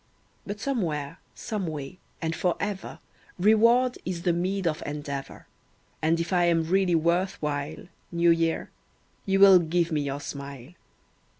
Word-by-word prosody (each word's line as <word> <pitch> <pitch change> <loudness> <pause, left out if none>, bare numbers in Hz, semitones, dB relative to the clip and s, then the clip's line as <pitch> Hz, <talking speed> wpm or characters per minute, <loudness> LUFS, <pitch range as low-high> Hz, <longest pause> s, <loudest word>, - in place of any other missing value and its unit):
But 205 +1 -5
somewhere, 170 - -2 0.2
some 210 -6 -4
way, 150 +2 -6 0.2
and 160 0 -1
for 180 -2 0
ever 200 -1 -4 0.4
Reward 230 +6 +4
is 175 -2 -4
the 175 -2 +2
meed 185 +2 -1
of 155 -2 0
endeavour; 145 -2 -6 0.6
And 160 +2 +2
if 170 +2 -2
I 175 -1 +4
am 165 -1 +3
really 180 +1 +2
worth 175 +4 +1
while, 145 -2 -3 0.3
New 170 0 +4
Year, 165 -1 0 0.6
you 195 0 +2
will 195 -2 +9
give 170 +1 0
me 150 -2 +1
your 140 0 -3
smile. 140 -2 -8
170 Hz, 145 wpm, -26 LUFS, 155-190 Hz, 0.6 s, will